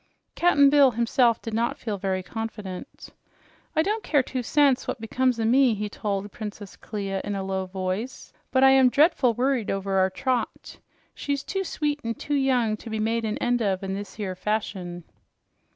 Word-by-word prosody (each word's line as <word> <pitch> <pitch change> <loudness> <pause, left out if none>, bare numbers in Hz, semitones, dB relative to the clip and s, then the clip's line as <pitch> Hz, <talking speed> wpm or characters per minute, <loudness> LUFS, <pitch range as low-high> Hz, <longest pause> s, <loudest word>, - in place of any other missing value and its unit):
Cap'n 285 -5 +4
Bill 285 -2 +6
himself 235 0 +2
did 225 - -5
not 230 +2 0
feel 210 -4 -4
very 190 -1 -1
confident. 210 -3 -7 0.7
"I 315 - +3
don't 430 +5 -1
care 290 -4 +2
two 255 0 -3
cents 275 +1 +2
what - - -3
becomes 245 +2 0
o' 225 - 0
me," 250 0 +4
he 210 0 -3
told 205 -1 -3
Princess 210 -2 -8
Clia 195 -3 -4
in 205 - -3
a 195 - -3
low 190 0 -2
voice, 190 +6 -4 0.2
"but 260 0 +3
I'm 265 -1 +7
drea'ful 270 -4 +3
worried 255 -2 0
over 195 0 0
our 190 0 +3
Trot. 250 +6 -3 0.3
She's 280 -1 -3
too 385 +5 -2
sweet 300 -4 -2
an' 230 0 -2
young 260 -6 +1
to 230 - -10
be 220 - -3
made 225 +1 0
an 215 0 -2
end 245 0 0
of 195 -3 0
in 190 0 -3
this 200 +1 -7
'ere 195 -3 -2
fashion." 185 -4 -3
225 Hz, 180 wpm, -25 LUFS, 195-260 Hz, 0.7 s, I'm